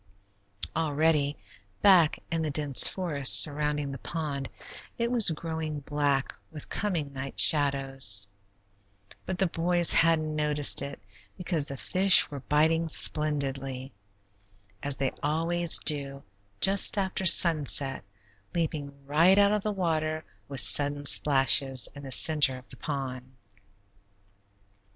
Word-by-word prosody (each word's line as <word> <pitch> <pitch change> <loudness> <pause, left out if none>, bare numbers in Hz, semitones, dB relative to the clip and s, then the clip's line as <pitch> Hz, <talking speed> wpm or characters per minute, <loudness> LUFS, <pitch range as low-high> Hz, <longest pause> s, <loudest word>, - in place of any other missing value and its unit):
Already, 150 -2 -1 0.5
back 180 -6 +3
in 165 -1 -3
the 155 - -4
dense 145 -2 +3
forest 150 -8 +3
surrounding 150 -1 -1
the 135 - -9
pond, 145 -4 -7 0.5
it 235 0 -3
was 235 -6 +5
growing 160 -2 -6
black 145 -1 -3 0.2
with 155 -3 -12
coming 165 -9 -5
night 135 0 -7
shadows, 135 -8 +3 1.0
but 185 0 -5
the 190 - 0
boys 175 0 -1
hadn't 155 -2 0
noticed 150 -1 +2
it, 140 -3 -8 0.4
because 170 -5 -3
the 140 - -8
fish 190 +5 +4
were 140 - -8
biting 160 +4 -1
splendidly, 135 -4 -1 0.9
as 140 -2 -4
they 135 0 -3
always 165 +3 +1
do 140 -2 -2 0.4
just 195 +1 +2
after 190 -1 -3
sunset, 150 -6 +2 0.5
leaping 145 -4 -6
right 165 +7 +2
out 200 0 +3
of 210 - -2
the 215 - -4
water 160 -4 -4 0.2
with 135 -2 +1
sudden 145 0 +1
splashes, 135 -3 +3
in 140 - -12
the 135 -1 -11
center 145 -3 +3
of 125 - -17
the - - -14
pond. 130 -3 -8
150 Hz, 125 wpm, -25 LUFS, 140-165 Hz, 1.0 s, was